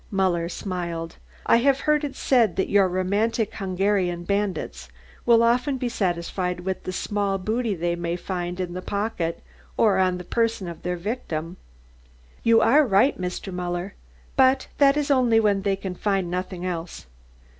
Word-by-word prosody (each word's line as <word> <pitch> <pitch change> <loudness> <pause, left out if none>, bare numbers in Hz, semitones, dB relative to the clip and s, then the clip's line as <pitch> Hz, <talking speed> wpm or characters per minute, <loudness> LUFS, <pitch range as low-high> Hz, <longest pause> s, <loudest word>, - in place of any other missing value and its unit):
Muller 180 -4 0
smiled. 170 -3 -4 0.3
"I - - +5
have 270 +3 +2
heard 300 0 +2
it 285 -2 -4
said 235 -8 +2
that 190 - -1
your 200 -2 +5
romantic 200 +5 0
Hungarian 190 -2 0
bandits 200 +1 -2 0.4
will 230 -1 +6
often 250 +4 +2
be 250 -1 -2
satisfied 180 -2 -2
with 190 +1 -4
the - - -2
small 200 +1 -1
booty 220 +2 -1
they 170 0 -1
may 170 0 -2
find 180 0 -4
in 180 -1 -3
the 185 - -5
pocket 200 -5 -3 0.3
or 205 -4 +4
on 185 -1 +2
the 180 - -7
person 225 -1 -1
of 170 -1 -8
their 180 0 -2
victim." 170 -4 -4 0.8
"You 230 -1 +5
are 300 +6 +5
right, 225 0 +3
Mr. 180 +1 -4
Muller. 180 +2 -3 0.4
But 265 0 +3
that 280 0 +5
is 295 -1 0
only 245 -4 +4
when 205 -3 +2
they 195 0 +1
can 190 -1 -5
find 195 -2 -1
nothing 180 0 -4
else." 170 - -5
195 Hz, 165 wpm, -24 LUFS, 180-225 Hz, 0.8 s, will